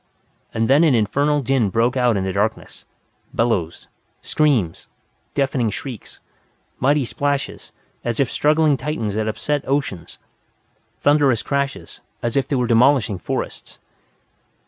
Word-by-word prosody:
And 110 0 0
then 140 +5 +5
an 150 -6 +4
infernal 140 +7 +1
din 130 -5 +1
broke 115 +6 +1
out 125 -4 +2
in 95 - -1
the 95 0 -2
darkness. 105 +3 -2 0.5
Bellows. 100 -9 0 0.4
Screams. 130 - +1 0.5
Deafening 135 -4 +1
shrieks. 120 -1 -7 0.6
Mighty 140 +1 +2
splashes, 140 +3 -3 0.3
as 120 -1 -2
if 135 -3 +1
struggling 150 -1 +3
Titans 125 -6 -3
had 110 +1 -1
upset 145 +6 -1
oceans. 135 - -2 0.8
Thunderous 145 -5 +3
crashes, 140 -1 -3 0.2
as 120 -1 -1
if 135 - +1
they 145 - -1
were 125 -1 +1
demolishing 115 -3 +3
forests. - - -5
130 Hz, 125 wpm, -21 LUFS, 110-145 Hz, 0.8 s, then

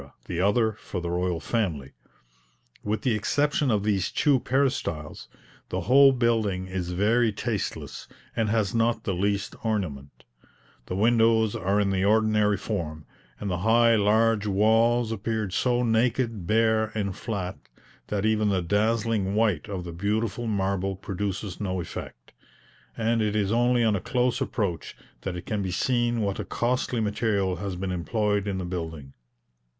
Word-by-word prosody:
the 85 -1 -2
other 110 +3 +3
for 100 -3 -6
the 85 0 -4
royal 90 -1 -1
family. 80 - -2 0.9
With 105 0 -2
the 125 - +2
exception 145 +6 +1
of 105 -4 +1
these 100 -3 +1
two 140 -3 +3
peristyles, 125 - -1 0.4
the 95 - -2
whole 135 +9 +6
building 115 -7 0
is 95 -1 -4
very 110 +6 +2
tasteless, 105 - -4 0.3
and 110 -2 0
has 110 -3 +1
not 115 0 +1
the 95 - -1
least 100 +3 -1
ornament; 85 -12 -3 0.6
the 90 - -3
windows 115 0 +3
are 100 +3 +1
in 100 -1 +1
the 95 -1 0
ordinary 105 -1 +3
form; 80 -7 -4 0.3
and 100 -2 -3
the 90 - -1
high 115 +3 +4
large 110 0 +2
walls 110 +3 +3
appear 110 0 -2
so 125 +5 +1
naked, 115 -3 0
bare, 110 0 +3
and 100 -3 -2
flat, 100 -5 -4 0.5
that 105 0 -1
even 110 -1 +2
the 95 -3 0
dazzling 105 +1 +1
white 105 -8 +1
of 95 -3 -4
the 85 -1 -7
beautiful 105 +5 -1
marble 95 -2 -1
produces 95 0 -4
no 95 -2 -2
effect; 85 - -8 0.7
and 115 0 +1
it 105 -1 0
is 100 -2 +1
only 120 +1 +3
on 110 -2 +3
a 95 - -2
close 125 +3 0
approach 95 - -3 0.2
that 95 -2 -4
it 90 0 -7
can 105 -2 -2
be 95 - -2
seen 120 +4 0
what 100 -2 -1
a - - -2
costly 125 0 -1
material 105 -4 0
has 95 0 -4
been 95 +1 -3
employed 105 +3 -1
in 100 -2 -2
the 95 - -3
building. 80 -6 -6
105 Hz, 155 wpm, -26 LUFS, 95-115 Hz, 0.9 s, whole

